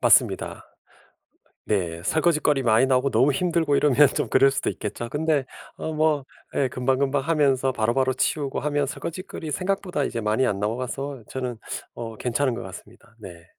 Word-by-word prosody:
맞습니다. - - +3 1.0
네 85 -5 -1
설거짓거리 150 - +2
많이 115 +2 +4
나오고 130 +1 +2
너무 130 +6 +4
힘들고 165 -1 +1
이러면 145 0 +5
좀 - - 0
그럴 135 +1 +5
수도 140 - -1
있겠죠. 110 +2 -5
근데 150 -3 0 0.3
어 160 - -4
뭐 155 -3 +1 0.3
예 135 - +2
금방금방 135 +2 0
하면서 135 -4 +2
바로바로 130 +3 +1
치우고 140 +1 -1
하면 145 -1 0
설거짓거리 165 +1 -6
생각보다 185 -1 -1
이제 115 - -2
많이 110 +4 +1
안 100 - -1
나와서 130 +5 -3
저는 125 -3 -4 0.4
어 115 -1 -6
괜찮은 125 +1 0
것 - - -6
같습니다. 110 - -12
네. 85 -4 -11
135 Hz, 360 characters per minute, -24 LUFS, 120-150 Hz, 1.0 s, 이러면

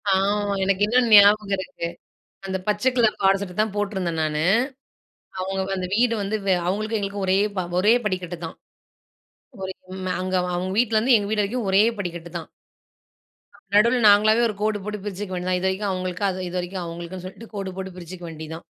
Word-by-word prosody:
ஆமா, 205 +1 +1
எனக்கு 195 +1 +1
இன்னும் 240 +2 +3
ஞாபகம் 205 0 +7
இருக்கு. 190 -3 -5 0.6
அந்த 190 0 -2
பச்ச 210 +2 0
கலர் 225 -3 +3
பாவாட 195 0 +4
சட்ட 180 -2 -6
தான் 215 -1 +1
போட்டிருந்தேன் 190 -5 -2
நானு. 155 0 -1 1.0
அவுங்க 190 +1 -2
அந்த 185 - -3
வீடு 235 +1 +3
வந்து 200 +2 -1
வெ 190 - +4
அவுங்களுக்கும் 215 +4 -1
எங்களுக்கும் 200 0 -3
ஒரே 190 +1 +3 0.2
ப - - +1 0.2
ஒரே 210 +5 +5
படிக்கட்டு 185 -3 -3
தான். - - -9 1.1
ஒரே 190 0 -4 0.2
ம் 185 -1 -3
அங்க 185 0 -2 0.2
அவுங்க 185 +1 -2
வீட்லேருந்து 230 +1 +4
எங்க 205 0 -3
வீடு 215 - +2
வரைக்கும் 220 0 -2
ஒரே 195 +2 +6 0.2
படிக்கட்டு 170 -2 -5
தான். 165 - -9 1.3
நடுவில 235 +4 +5
நாங்களாவே 215 +3 +5
ஒரு 210 - -4
கோடு 215 -1 +1
போட்டு 210 0 -4
பிரிச்சுக்க 200 -1 -5
வேண்டியதுதான். 180 0 -1
இதுவரைக்கும் 190 +2 -1
அவுங்களுக்கு, 185 0 -3
அது 185 - -5
இது 180 - -6
வரைக்கும் 180 +1 -4
அவுங்களுக்குன்னு 170 +2 -7
சொல்லிட்டு 225 +4 -10
கோடு 195 -2 -4
போட்டு 190 0 -5
பிரிச்சுக்க 175 0 -9
வேண்டியது 160 0 -7
தான். 170 - -13
195 Hz, 175 wpm, -23 LUFS, 185-210 Hz, 1.3 s, ஞாபகம்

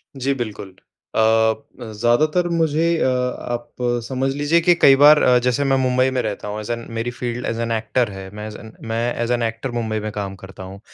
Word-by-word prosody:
जी, 135 +1 -1
बिल्कुल। 105 -6 -6 0.4
अ, - - +3 0.7
ज़्यादातर 150 +11 +2
मुझे 165 -1 +1
अ, - - +1
आप 125 -1 -3 0.4
समझ 130 0 -1
लीजिए 145 +4 +2
कि 175 +1 +5
कई 135 -5 +6
बार 150 +2 +7
अ, 125 0 +5
जैसे 125 +3 0
मैं 135 -1 +2
मुंबई 130 0 +2
में 130 -1 0
रहता 105 -2 -4
हूँ, 105 +1 -4
ऐज़ 110 +2 -5
एन 115 0 -4
मेरी 120 +2 -2
फ़ील्ड 120 0 -4
ऐज़ 115 0 -2
एन 115 0 -2
एक्टर 115 +1 0
है, 95 0 -8
मैं 105 0 -6
ऐज़ 105 - -8
एन 110 - -12 0.2
मैं 115 +2 -1
ऐज़ 120 +1 -1
एन 120 -1 0
एक्टर 115 +3 -3
मुंबई 110 -2 -2
में 110 0 -4
काम 100 -2 -5
करता 95 -1 -10
हूँ। 95 +1 -10
120 Hz, 215 wpm, -20 LUFS, 110-135 Hz, 0.7 s, बार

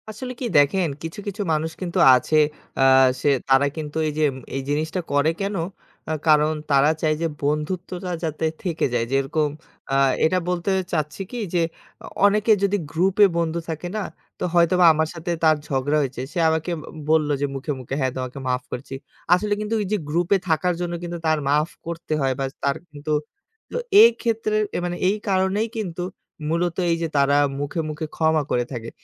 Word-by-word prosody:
আসলে 250 +4 -6
কি 255 - -3
দেখেন, 165 +6 +4 0.2
কিছু, 165 +5 -6
কিছু 205 +1 -4
মানুষ 155 +1 -1
কিন্তু 175 -2 -2 0.2
আছে, 125 +5 0 0.4
আ - - +4 0.4
সে 145 - +3 0.2
তারা 135 +1 +5
কিন্তু 150 0 -5
এই - - -1
যে - - +3 0.3
এই 135 - -1
জিনিসটা 155 +5 -1
করে 145 +2 +3
কেন? 200 +1 -2 0.5
আ - - -1 0.2
কারণ 155 0 +5 0.2
তারা 140 +1 +5
চায় 155 -1 +2
যে 165 - +2
বন্ধুত্বটা 175 +5 -2
যাতে 160 0 -2 0.2
থেকে 170 -4 0
যায়। 115 -1 +1
যেরকম 135 +3 +1 0.4
আ - - +2 0.3
এটা 175 +4 +2
বলতে 180 +1 -1 0.2
চাচ্ছি 155 +2 -2
কি 245 - -5 0.2
যে 175 - +2 0.6
অনেকে 210 +2 +3
যদি 200 +1 +2
গ্রুপে 190 +5 +4
বন্ধু 170 0 0
থাকে 160 +2 -4
না, 210 - -1 0.4
তো - - -3
হয়তোবা 175 +1 +4
আমার 160 0 +1
সাথে 170 +1 -4
তার 155 -1 +6
ঝগড়া 140 +2 0
হয়েছে। 135 -2 -3
সে 175 - -2
আমাকে 160 +2 -1
অ - - -9 0.3
বলল, 155 -1 +3
যে - - +2
মুখে, 135 +3 -3
মুখে 130 +1 -5
"হ্যাঁ, 130 -2 +1
তোমাকে 130 +1 -5
মাফ 125 0 0
করেছি।" 130 +2 -6 0.4
আসলে 205 +3 +2
কিন্তু 210 +1 -3
ওই - - -2
যে 210 - +2
গ্রুপে 175 +5 +2
থাকার 175 +3 +2
জন্য, 175 -1 -2
কিন্তু 175 0 -4
তার 155 0 +3
মাফ 150 +3 +2 0.2
করতে 170 -1 -4
হয়, 135 -1 +2
বা 135 - 0 0.2
তার 140 0 +1 0.2
কিন্তু 145 +1 -6 0.6
তো - - -2 0.3
এক্ষেত্রে 230 -2 +1 0.2
এ - - +1
মানে 175 0 -2
এই 195 - +2
কারণেই 190 +4 +1
কিন্তু 180 -5 -3 0.5
মূলত 170 +1 0 0.2
এই - - +3
যে - - 0
তারা 140 0 +4 0.2
মুখে, 145 +4 -3
মুখে 155 +1 -4
ক্ষমা 160 -1 +2
করে 120 0 +1
থাকে। 115 -3 -5
160 Hz, 185 wpm, -23 LUFS, 145-180 Hz, 0.6 s, তার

